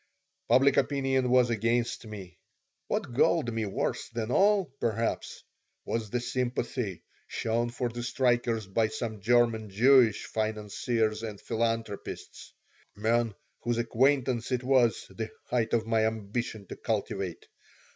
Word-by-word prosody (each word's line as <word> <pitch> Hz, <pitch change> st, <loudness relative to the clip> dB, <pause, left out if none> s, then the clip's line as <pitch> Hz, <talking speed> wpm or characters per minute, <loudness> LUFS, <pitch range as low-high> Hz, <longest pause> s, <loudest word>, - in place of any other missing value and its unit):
Public 135 Hz, +1 st, +5 dB
opinion 135 Hz, -2 st, +1 dB
was 125 Hz, -1 st, +4 dB
against 115 Hz, +1 st, 0 dB
me. 95 Hz, -4 st, -9 dB, 0.5 s
What 120 Hz, -, -2 dB
galled 130 Hz, -1 st, +2 dB
me 110 Hz, -2 st, -1 dB
worse 95 Hz, -, -2 dB
than 115 Hz, 0 st, -3 dB
all, 200 Hz, +4 st, +4 dB
perhaps, 115 Hz, 0 st, -2 dB, 0.4 s
was 115 Hz, -2 st, -2 dB
the 125 Hz, -, -1 dB
sympathy 120 Hz, -5 st, -2 dB, 0.2 s
shown 115 Hz, +1 st, -1 dB
for 120 Hz, +1 st, -2 dB
the 120 Hz, +1 st, -5 dB
strikers 120 Hz, -3 st, +1 dB
by 110 Hz, +3 st, +1 dB
some 110 Hz, -1 st, -5 dB
German 115 Hz, -1 st, +2 dB
Jewish 120 Hz, +1 st, +5 dB
financiers 110 Hz, +1 st, -1 dB
and 110 Hz, -3 st, -6 dB
philanthropists, 115 Hz, -2 st, -3 dB, 0.4 s
men 115 Hz, +1 st, +1 dB, 0.2 s
whose 120 Hz, 0 st, -1 dB
acquaintance 125 Hz, +1 st, +1 dB
it 125 Hz, -1 st, 0 dB
was 125 Hz, -3 st, +3 dB
the 110 Hz, -1 st, -5 dB, 0.2 s
height 115 Hz, -2 st, +1 dB
of 115 Hz, -2 st, +1 dB
my 110 Hz, -1 st, +2 dB
ambition 110 Hz, 0 st, -4 dB
to -, -, -6 dB
cultivate. -, -, -3 dB
115 Hz, 125 wpm, -29 LUFS, 110-125 Hz, 0.5 s, Public